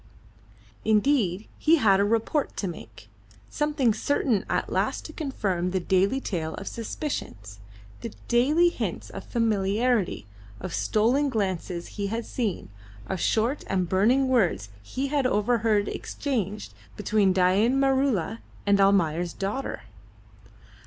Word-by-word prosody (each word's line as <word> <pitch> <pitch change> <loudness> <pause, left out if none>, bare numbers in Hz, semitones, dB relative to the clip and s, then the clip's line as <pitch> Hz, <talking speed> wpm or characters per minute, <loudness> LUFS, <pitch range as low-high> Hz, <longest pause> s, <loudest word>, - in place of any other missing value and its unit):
Indeed, 215 -3 +2
he 320 +2 +5
had 205 -10 +4
a - - +4
report 230 +7 0
to 200 - -2
make. 110 - -9 0.4
Something 295 -6 +1
certain 235 -4 0
at - - -1
last - - -1
to 310 - -8
confirm 200 - -2
the 190 +1 0
daily 190 +8 +2
tale 165 -10 -3
of 195 - -8
suspicions, 105 - -5 0.4
the - - -6 0.2
daily 295 +9 +4
hints - - -4
of - - -7
familiarity, 220 - 0 0.3
of 175 - -6
stolen 250 +7 +2
glances 185 -6 -2
he 200 -1 -4
had 225 +3 -3
seen, 215 - -3 0.4
of 190 - -3
short 230 - +1
and 185 -2 0
burning 235 +9 +3
words 190 - +1
he 260 - -4
had 280 -3 +1
overheard 215 -2 +1
exchanged 215 -7 -3 0.2
between 210 -2 +2
Dain 190 +8 +3
Maroola 265 - +1 0.3
and 200 -1 +4
Almayer's 175 -4 +2
daughter. 205 +8 -4
210 Hz, 125 wpm, -26 LUFS, 190-260 Hz, 0.4 s, he